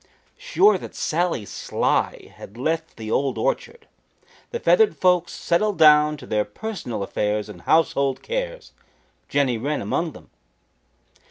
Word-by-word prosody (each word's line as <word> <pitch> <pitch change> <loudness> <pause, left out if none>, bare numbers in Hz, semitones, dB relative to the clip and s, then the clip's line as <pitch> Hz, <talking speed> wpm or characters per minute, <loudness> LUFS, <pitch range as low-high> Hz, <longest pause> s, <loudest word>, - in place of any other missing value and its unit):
Sure 455 -4 +3
that - - -10
Sally 165 -9 -1
Sly - - -2
had 105 - -12
left 160 +5 -2
the 110 -1 -6
Old 135 +3 0
Orchard, 470 -1 -2 0.6
the 475 - -4
feathered 445 -3 +3
folks 180 -2 +2
settled 200 +4 0
down 150 -1 +6
to - - -11
their 105 -1 0
personal 120 - -5
affairs 105 +1 -1
and 105 - -11
household 140 -4 +1
cares, - - -4 0.6
Jenny 130 -5 +1
Wren 145 +5 -2
among 165 -3 -2
them. - - -15
160 Hz, 135 wpm, -23 LUFS, -, 0.6 s, down